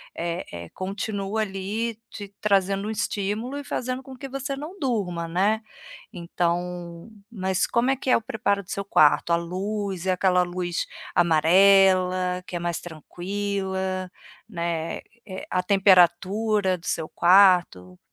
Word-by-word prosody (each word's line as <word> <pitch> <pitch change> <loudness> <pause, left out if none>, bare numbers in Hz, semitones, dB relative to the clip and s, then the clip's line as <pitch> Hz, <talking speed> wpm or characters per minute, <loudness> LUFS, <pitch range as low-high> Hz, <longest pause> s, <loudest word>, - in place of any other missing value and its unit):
eh 170 +1 -3
eh, 85 -1 -8
continua 200 +2 -3
ali 210 +3 -3
te 205 -1 -9
trazendo 195 0 +1
um - - -3
estímulo 215 +5 -3
e 285 - -5
fazendo 255 +1 -3
com 265 0 -11
que 270 +1 -8
você 275 +1 -4
não 315 +8 -8
durma, 190 - -2
né. 200 +6 +1 0.5
Então 175 +1 -3 0.2
mas 190 -4 -1
como 245 +3 +1
é 270 - 0
que 260 - -4
é - - +6
o - - -5
preparo 210 -4 -1
do 180 - -12
seu 200 0 -3
quarto? 155 -1 +4
A - - +6
luz, 190 +1 -4
é 185 - +3
aquela 180 -1 +2
luz 175 -1 -3 0.3
amarela, 185 +2 +4
que 180 - -6
é - - -1
mais 170 -1 -2
tranquila, 190 +2 -4 0.4
né, 170 -4 -3 0.3
eh, 190 -1 -7
a 185 - +1
temperatura 190 +1 +3
do 175 - -16
seu 155 - -2
quarto? 175 - +4
190 Hz, 145 wpm, -24 LUFS, 175-210 Hz, 0.5 s, é